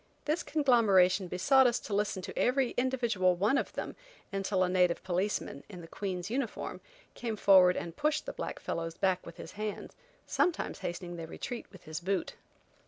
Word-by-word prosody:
This 305 +3 0
conglomeration 205 - +4
besought 265 +10 +4
us 240 - +1
to 210 - -6
listen 200 -2 0
to - - -7
every 255 0 +2
individual 235 -8 +1
one 205 +9 +2
of - - 0
them - - -5 0.4
until 195 -1 +1
a - - +2
native 180 -2 +2
policeman, 185 +3 -2
in 180 -4 -9
the 165 - -10
Queen's 185 -1 -4
uniform, 240 +1 -3 0.3
came 230 -2 -3
forward 190 -3 +6
and 170 -1 -5
pushed 300 +1 0
the - - -5
black - - -5
fellows 165 0 -4
back 185 -1 +1
with 170 - -10
his - - -8
hands, 210 0 -5 0.3
sometimes 355 - 0
hastening 175 0 -5
their 165 -1 -6
retreat 245 +8 -6
with 190 -3 -15
his 155 +1 -5
boot. 185 +1 -2
195 Hz, 175 wpm, -31 LUFS, 180-240 Hz, 0.4 s, forward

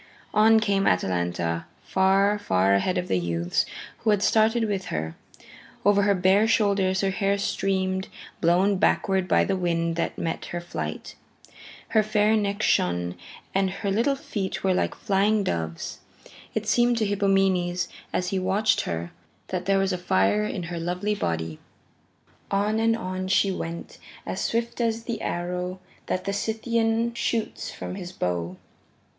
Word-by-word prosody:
On 220 +1 +6
came 200 -2 +1
Atalanta, 85 -2 0 0.2
far, 195 +2 +3
far 95 - +2
ahead 140 - +1
of 180 - -2
the 90 - +1
youths 85 0 0 0.3
who 225 - 0
had 210 -1 +3
started 225 +1 +3
with 200 -3 -1
her. 80 +1 -3 0.7
Over 205 0 +5
her 200 0 +3
bare 190 +4 +4
shoulders 200 -4 +2
her 195 -1 +1
hair 200 0 +1
streamed, 190 -1 -1 0.3
blown 185 +4 +3
backward 190 -1 +2
by - - +4
the 195 - 0
wind 170 -2 0
that 170 - -2
met 165 - -3
her 175 - -4
flight. 175 - -5 0.8
Her 220 - +4
fair 215 0 +2
neck 205 0 -1
shone, 90 0 +1 0.4
and 195 0 +2
her 195 +1 -3
little 235 +7 +2
feet 200 -8 -4
were 190 -1 +3
like - - 0
flying 205 +1 +2
doves. 80 - -3 0.6
It - - -1
seemed 240 0 +3
to 220 - +1
Hippomenes 195 -3 +1 0.2
as 180 0 -1
he 195 - 0
watched 200 +3 +2
her 85 0 -3 0.4
that 185 0 -3
there 195 0 +4
was 195 0 +1
fire 105 - +2
in 140 +11 -3
her 170 0 -5
lovely 180 +5 -1
body. 80 - -3 0.9
On 205 +2 +1
and 225 0 +2
on 185 -3 -4
she 195 +1 +3
went 170 -2 -6 0.3
as - - -3
swift 235 +1 -1
as 225 -1 0
the 230 -2 -4
arrow 180 +1 -3 0.3
that 185 - -1
the 200 - -1
Scythian 225 +2 0
shoots 230 -1 -2
from - - -6
his 180 -2 -6
bow. 90 - -2
190 Hz, 155 wpm, -25 LUFS, 175-210 Hz, 0.9 s, On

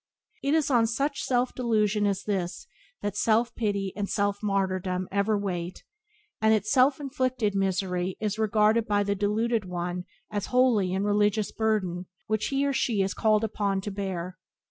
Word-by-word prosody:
It 280 +3 +1
is 310 -3 +1
on 235 -3 +4
such 275 +5 -1
self 250 0 0
delusion 215 -4 +1
as 195 -1 -1
this 190 -4 -3 0.4
that 205 -1 -2
self 230 +2 +2
pity 200 -4 -1
and 205 -1 -3
self 205 -1 0
martyrdom 185 -2 -1
ever 200 +2 +1
wait, 180 -3 -4 0.6
and 220 0 +5
its 215 0 -2
self 265 +1 +4
inflicted 255 -6 -1
misery 190 -2 -1
is 215 0 -2
regarded 215 +1 +3
by 205 -1 +2
the 200 0 0
deluded 215 +3 0
one 180 0 -4 0.3
as 205 -1 -2
a - - -13
holy 245 -7 +3
and 190 +2 0
religious 210 0 +2
burden 190 -5 -1 0.2
which 215 -1 -1
he 275 0 0
or 280 - +1
she 225 -7 +1
is 190 - -2
called 215 -1 +2
upon 205 -2 0
to 205 - -5
bear. 185 -2 -4
205 Hz, 170 wpm, -27 LUFS, 195-225 Hz, 0.6 s, and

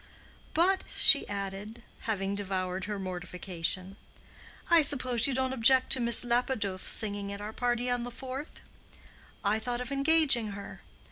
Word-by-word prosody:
"But;" 375 +4 +3
she - - +6
added, 200 +3 -6 0.3
having 195 -2 -1
devoured 190 -2 -3
her 210 0 -4
mortification, 185 0 -4 0.7
"I 335 -1 +6
suppose 255 -5 +1
you 270 - -2
don't 260 0 -1
object 260 +1 +4
to 260 - +4
Miss 235 0 +5
Lapidoth's 235 -6 -1
singing 205 -2 +1
at 200 - -6
our 210 +1 -7
party 245 0 -1
on 245 -1 -1
the 245 - -5
fourth? 265 +4 -8 0.8
I 210 +2 +1
thought 240 +2 -4
of 250 +1 -5
engaging 275 -6 +3
her. 200 0 -10
225 Hz, 145 wpm, -29 LUFS, 200-255 Hz, 0.8 s, she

